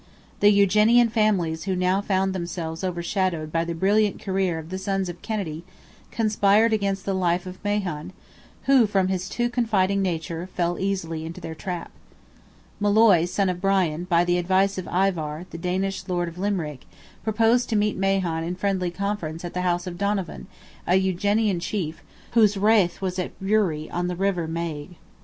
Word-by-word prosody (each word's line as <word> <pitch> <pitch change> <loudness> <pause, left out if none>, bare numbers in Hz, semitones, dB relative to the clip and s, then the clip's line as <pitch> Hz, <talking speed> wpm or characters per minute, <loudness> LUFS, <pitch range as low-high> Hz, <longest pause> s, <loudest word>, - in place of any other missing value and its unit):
The 205 - +6
Eugenian 210 +4 +5
families 195 -8 +1
who 190 -2 0
now 185 +2 +1
found 190 -1 0
themselves 170 -2 -4
overshadowed 175 -2 -1
by 165 +1 +1
the 170 0 -4
brilliant 205 +4 +2
career 190 -3 -1
of 160 +1 -8
the 185 - -3
sons 195 -1 -1
of 175 0 -8
Kennedy, 175 -8 -4 0.5
conspired 215 0 +3
against 200 -2 -1
the 195 - 0
life 180 -1 0
of 185 +1 -9
Mahon, 190 -7 -2 0.5
who, 265 -5 +5
from 195 -2 +1
his 185 0 -2
too 240 0 0
confiding 205 -5 +1
nature, 170 -1 -3
fell 175 0 0
easily 175 -5 -2
into 165 +1 -7
their 160 - -6
trap. 175 +1 -5 0.9
Molloy, 205 -4 +5
son 195 +2 0
of 180 -1 -2
Bran, 180 -4 +1
by 175 -1 +3
the 175 0 +2
advice 190 +2 +2
of 185 - -6
Ivar, 175 -4 0
the 170 - -7
Danish 190 +3 -2
lord 175 -2 -1
of 170 +1 -8
Limerick, 175 -9 -3 0.4
proposed 225 +3 +2
to 225 - 0
meet 210 0 +1
Mahon 190 -4 0
in 175 +2 -3
friendly 185 -1 -1
conference 175 -3 -4
at 175 - -6
the 180 - -2
house 175 -1 0
of 175 -1 -7
Donovan, 200 -3 -2 0.4
an 185 +2 +4
Eugenian 195 +1 +1
chief, 170 -3 -3 0.3
whose 215 -3 +4
rath 200 -4 +3
was 185 0 -2
at 180 - -5
Bruree, 190 -6 +1
on 175 +1 -1
the 180 - -2
river 180 -3 0
Maigue. 165 0 -5
185 Hz, 170 wpm, -24 LUFS, 170-200 Hz, 0.9 s, The